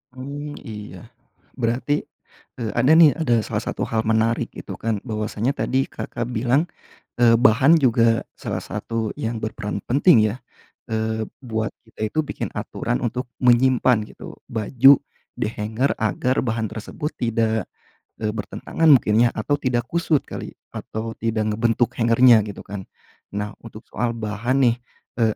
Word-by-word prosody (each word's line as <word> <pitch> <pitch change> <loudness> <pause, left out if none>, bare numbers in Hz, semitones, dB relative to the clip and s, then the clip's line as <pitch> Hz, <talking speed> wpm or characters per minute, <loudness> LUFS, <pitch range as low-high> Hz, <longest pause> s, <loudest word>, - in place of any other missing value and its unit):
Mmm, 145 +3 -7
iya. 105 -4 -9 0.5
Berarti, 125 +5 0 0.5
eee, 115 -3 -2
ada, 130 +6 +5
nih, 160 -2 +8
ada 120 -8 +2
salah - - -3
satu - - -4
hal 110 0 0
menarik 110 +1 +1
itu, - - -7
kan, 110 -3 -2
bahwasanya 110 +1 -2
tadi 130 +1 +1
Kakak 120 0 -5
bilang, 125 +8 +1 0.5
eee, 115 -1 +6
bahan 130 +8 +5
juga 115 -5 +3
salah - - -4
satu 115 -2 -4
yang 115 -5 -3
berperan 110 -1 -4
penting, 130 -3 +5
ya? 125 - -11 0.5
Eee, 110 0 -1 0.2
buat 110 -4 -3 0.2
kita 110 - -5
itu 155 - +2
bikin 150 - -5
aturan - - -3
untuk 125 +2 -2 0.2
menyimpan, 125 -2 +4
gitu, - - -11 0.2
baju 125 +5 +5 0.3
dihanger, 110 +5 -1
agar 115 +5 0
bahan 110 -2 -1
tersebut 150 +9 -5
tidak, 110 -3 0 0.6
eee, 105 - +1
bertentangan 115 +9 -2
mungkin, 115 -1 +3
ya, - - +1
atau 145 +6 0
tidak 120 -3 0
kusut 170 -4 +1
kali, - - -8 0.2
atau 110 +1 -5
tidak 110 -1 0
ngebentuk 115 +2 +1
hangernya, 115 0 +6
gitu, 100 - -8
kan? 100 -2 -7 0.5
Nah, 105 0 -2
untuk 115 -1 -11
soal 120 -1 -1
bahan, 115 +5 0
nih, - - -2 0.4
eee, 110 -2 +2
115 Hz, 145 wpm, -22 LUFS, 110-130 Hz, 0.6 s, nih